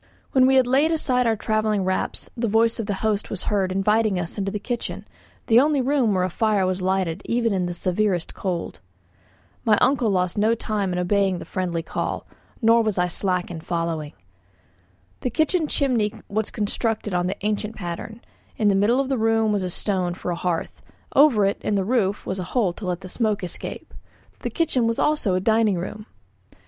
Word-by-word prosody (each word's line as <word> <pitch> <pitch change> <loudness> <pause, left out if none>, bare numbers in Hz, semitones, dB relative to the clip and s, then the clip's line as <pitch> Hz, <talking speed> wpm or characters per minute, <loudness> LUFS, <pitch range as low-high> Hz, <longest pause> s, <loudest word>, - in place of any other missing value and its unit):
When 260 -1 +5
we 265 - +4
had 260 -1 +5
laid 275 +6 +3
aside 250 -6 +2
our 225 - +2
travelling 215 -1 0
wraps 185 0 -2
the 235 -1 -1
voice 225 +2 +2
of 220 - -3
the 205 - -1
host 215 -1 0
was 195 - -4
heard 195 -3 0
inviting 210 +1 +2
us 170 0 -4
to 205 - -4
the 195 +2 -2
kitchen, 240 +3 -4 0.4
the 230 +1 +6
only 290 +1 +3
room 255 -5 +2
where 185 - +2
a 185 - 0
fire 210 -1 +1
was 185 0 -1
lighted 185 -1 0
even 230 -2 +1
in 180 -2 0
the 175 - -3
severest 185 -1 0
cold. 180 -3 -4 0.8
My 215 -3 +4
uncle 250 -3 +2
lost 185 0 0
no 220 +2 +3
time 210 -4 -2
in 180 - -2
obeying 190 +1 +1
the - - -8
friendly 175 -3 -2
call, - - -3 0.4
nor 230 +1 +6
was 215 -3 -1
I 180 0 +2
slack 180 0 -1
in 165 -2 -6
following. 165 -3 -3 1.1
The - - -1
kitchen 315 - +1
chimney 245 -8 +1 0.2
was 215 +1 -1
constructed 215 -1 -1
on 180 0 +1
the 190 - -3
ancient 210 +1 -1
pattern; 190 +5 -6 0.4
in 210 -2 +3
the - - +4
middle 215 +6 +3
of 275 - 0
the 265 -3 -1
room 225 -1 +2
was 205 - 0
a 185 - -2
stone 180 -1 -1
for 180 - -4
a - - -1
hearth, 170 -1 -3 0.3
over 265 -8 +6
it 195 - 0
in 210 - 0
the 195 -1 0
roof 210 -3 0
a 190 0 -3
hole 185 +1 0
to 190 +1 -7
let 180 0 -2
the 185 - -8
smoke 215 0 -1
escape. 180 - -6 0.5
The - - -3
kitchen 280 -8 +1
was 230 - 0
also 295 -11 +1
a - - +2
dining 220 0 +3
room. 210 +5 -6
210 Hz, 200 wpm, -23 LUFS, 185-230 Hz, 1.1 s, the